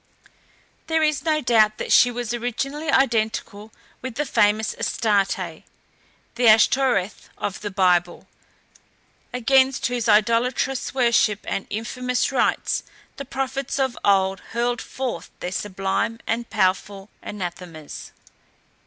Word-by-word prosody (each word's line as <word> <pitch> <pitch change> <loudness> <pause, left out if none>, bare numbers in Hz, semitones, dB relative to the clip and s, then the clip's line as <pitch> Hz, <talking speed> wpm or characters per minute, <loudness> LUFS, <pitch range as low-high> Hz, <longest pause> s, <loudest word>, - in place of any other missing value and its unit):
There 320 -1 +1
is 300 -3 +1
no 310 -1 +2
doubt 220 -4 +3
that - - -4
she 245 - +7
was 240 -1 -4
originally 275 +6 -3
identical 220 -5 0 0.3
with 260 -3 -6
the 295 +3 -1
famous 210 -2 +2
Astarté, 195 -6 -1 0.7
the 240 0 +2
Ashtoreth 220 -2 +3
of 195 - -4
the 205 - -4
Bible, 180 -3 +1 1.1
against 265 +2 +2
whose 240 -2 -1
idolatrous 235 +5 +1
worship 235 -4 +3
and 195 - -3
infamous 250 +4 -2
rites 265 - +1 0.4
the 275 - -6
prophets 270 0 -3
of 265 -3 0
old 195 -1 +2
hurled 240 +1 0
forth 245 -10 -5
their 180 - -4
sublime 195 +4 -2
and 235 +1 -2
powerful 195 0 -1
anathemas. 175 -5 -7
230 Hz, 115 wpm, -23 LUFS, 200-255 Hz, 1.1 s, she